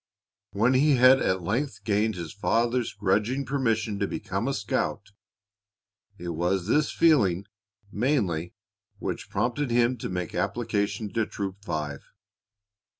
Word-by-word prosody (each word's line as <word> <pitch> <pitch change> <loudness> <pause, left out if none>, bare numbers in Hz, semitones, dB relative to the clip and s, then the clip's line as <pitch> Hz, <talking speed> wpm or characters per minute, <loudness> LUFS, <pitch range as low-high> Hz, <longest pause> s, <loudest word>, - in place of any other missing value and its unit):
When 110 +6 +2
he 140 +2 +4
had 130 +2 +6
at 95 -1 0
length 125 - -2
gained 105 0 +1
his 85 -3 -6
father's 115 +3 +1
grudging 105 +7 0
permission 115 -6 0
to - - 0
become - - -3
a - - 0
scout, 100 0 -2 1.1
it 85 0 -6
was 90 +2 0
this 150 +8 +2
feeling 100 - +3 0.5
mainly 100 - 0 0.4
which - - -5
prompted 120 +7 -1
him 120 +1 +2
to - - -4
make 90 -3 -3
application 105 -2 -1
to 115 -2 0
Troop 100 0 -5
Five. 75 -7 -3
105 Hz, 130 wpm, -27 LUFS, 95-125 Hz, 1.1 s, had